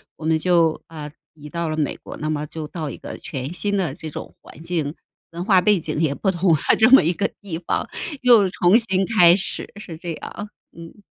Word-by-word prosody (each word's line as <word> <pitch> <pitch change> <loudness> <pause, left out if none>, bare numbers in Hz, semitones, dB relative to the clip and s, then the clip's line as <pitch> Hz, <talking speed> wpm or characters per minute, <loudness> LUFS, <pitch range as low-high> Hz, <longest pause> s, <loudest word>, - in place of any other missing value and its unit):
我 155 - -9
们 160 0 +2
就， 170 -2 +2
啊， 150 -2 -8 0.2
移 150 -1 -12
到 170 +1 -3
了 155 - -3
美 150 - -1
国， - - -10
那 155 - -4
么 150 -1 -2
就 155 -1 -7
到 155 -2 -5
一 - - -7
个 - - -9
全 135 +5 -6
新 200 +4 0
的 170 -8 -1
这 155 0 -8
种 - - -8
环 - - -15
境 165 -3 -2 0.3
文 170 +2 -6
化 190 -4 +5
背 205 -1 +3
景 155 -1 -3
也 145 -3 +1
不 195 - 0
同 175 0 +1
了 - - 0 0.2
这 220 +3 +6
么 265 - +8
一 170 +3 +1
个 200 +3 0
地 175 -5 -6
方， 175 - -2 0.4
又 225 -6 +6
重 180 +6 +4
新 190 -4 +1
开 180 -6 +6
始， 195 - -2
是 175 -5 -8
这 170 0 -5
样。 205 +6 -8 0.3
嗯。 170 +5 -12
170 Hz, 240 characters per minute, -22 LUFS, 155-195 Hz, 0.4 s, 么